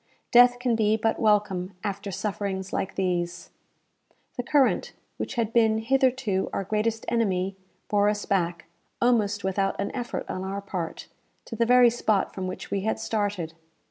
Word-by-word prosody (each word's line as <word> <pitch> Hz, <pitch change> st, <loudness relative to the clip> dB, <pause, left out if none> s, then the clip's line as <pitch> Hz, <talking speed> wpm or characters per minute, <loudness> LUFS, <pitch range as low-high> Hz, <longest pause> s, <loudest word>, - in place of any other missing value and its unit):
"Death 245 Hz, 0 st, +7 dB
can 245 Hz, -1 st, 0 dB
be 215 Hz, -1 st, +2 dB
but 225 Hz, 0 st, 0 dB
welcome 205 Hz, -4 st, +1 dB
after 200 Hz, 0 st, -3 dB
sufferings 195 Hz, -1 st, -3 dB
like 190 Hz, -1 st, -2 dB
these." 175 Hz, -2 st, -2 dB, 0.8 s
The -, -, -2 dB
current, 270 Hz, +1 st, +2 dB, 0.2 s
which -, -, -4 dB
had 230 Hz, -2 st, -1 dB
been 220 Hz, -2 st, +4 dB
hitherto 255 Hz, -4 st, +1 dB
our -, -, -2 dB
greatest 215 Hz, +3 st, -1 dB
enemy, 195 Hz, -5 st, 0 dB, 0.3 s
bore 205 Hz, 0 st, +3 dB
us 210 Hz, -1 st, -2 dB
back, 170 Hz, -4 st, -1 dB, 0.3 s
almost 215 Hz, -4 st, +2 dB
without 195 Hz, 0 st, 0 dB
an 200 Hz, -, -3 dB
effort 245 Hz, -2 st, -4 dB
on 185 Hz, -, -4 dB
our 195 Hz, +1 st, -3 dB
part, 185 Hz, -4 st, -5 dB, 0.4 s
to -, -, -7 dB
the 230 Hz, +1 st, +1 dB
very 245 Hz, -1 st, +6 dB
spot 215 Hz, -4 st, 0 dB
from 190 Hz, -1 st, -4 dB
which 185 Hz, -, -7 dB
we 200 Hz, -, 0 dB
had 220 Hz, +3 st, -1 dB
started. 205 Hz, -7 st, -2 dB
205 Hz, 160 wpm, -26 LUFS, 190-230 Hz, 0.8 s, Death